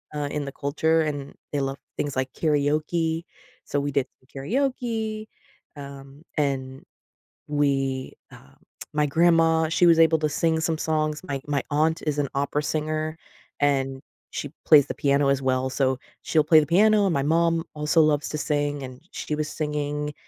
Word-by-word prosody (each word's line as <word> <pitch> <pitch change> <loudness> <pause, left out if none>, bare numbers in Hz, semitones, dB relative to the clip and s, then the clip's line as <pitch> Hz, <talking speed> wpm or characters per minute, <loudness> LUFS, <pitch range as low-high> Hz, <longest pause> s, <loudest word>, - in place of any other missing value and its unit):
uh, 145 -1 -2
in 150 -1 -2
the 140 - -5
culture, 160 +3 +1
and 145 -3 -3 0.2
they 145 - -1
love 135 0 -2 0.2
things 145 -2 -2
like 130 0 -1
karaoke. 155 +2 0 0.4
So, 145 - -1
we 145 0 -2
did 140 -1 0
the 130 - -28
karaoke, 220 - -2 0.5
um, 140 0 -11
and 135 -2 -1 0.6
we, 135 -3 0 0.2
uh, 65 - -16 0.4
my 150 0 +2
grandma, 165 +1 +3
she 170 +2 +3
was 165 -1 +6
able 160 0 +5
to 155 0 0
sing 160 +2 +1
some 160 0 0
songs. 155 -1 -1
My 140 -6 -4
my 145 -2 0
aunt 160 +3 +1
is 150 -1 0
an 145 - +1
opera 140 +1 0
singer, 155 +1 -2 0.4
and 135 -2 +1 0.3
she 145 - -5
plays 150 -3 +7
the - - -3
piano 140 0 +2
as 140 -1 +1
well, 130 0 0
so 130 -1 +1 0.3
she'll 155 -2 +2
play 155 +1 +6
the 150 - 0
piano, 210 +4 +4
and 190 - +1
my 140 -2 +1
mom 165 +2 +2
also 150 +2 +3
loves 150 -2 +2
to 155 - -3
sing, 145 -1 -1
and 130 -1 -8
she - - -5
was 155 0 -2
singing, 150 -1 -3
150 Hz, 170 wpm, -25 LUFS, 140-160 Hz, 0.6 s, plays